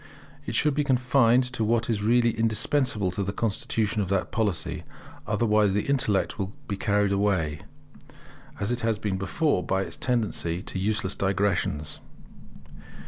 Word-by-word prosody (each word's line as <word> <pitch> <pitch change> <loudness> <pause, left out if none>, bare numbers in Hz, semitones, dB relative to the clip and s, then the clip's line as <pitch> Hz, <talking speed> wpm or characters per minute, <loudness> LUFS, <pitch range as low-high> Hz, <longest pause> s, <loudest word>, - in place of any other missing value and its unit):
It - - -3
should 150 - +2
be 150 +1 +1
confined 125 -2 +3
to 115 - -1
what 115 +1 +1
is 110 -3 -1
really 120 +2 +3
indispensable 110 -2 +1
to 95 - -3
the 100 0 -1
construction 110 0 -1
of 95 - -3
that 95 -2 0
Polity. 105 -7 -1 0.5
Otherwise 105 -3 +2
the 105 - +1
intellect 125 -8 0
will 95 +1 -3
be 100 - -2
carried 100 0 +1
away, 95 -7 0 1.0
as 100 +3 -1
it 120 - 0
has 115 -2 0
been 100 -3 -2
before, 145 - 0
by 95 0 0
its - - -7
tendency 105 -8 -1
to 95 - -5
useless 100 -1 0
digressions. 95 -6 -1
105 Hz, 150 wpm, -26 LUFS, 95-115 Hz, 1.0 s, confined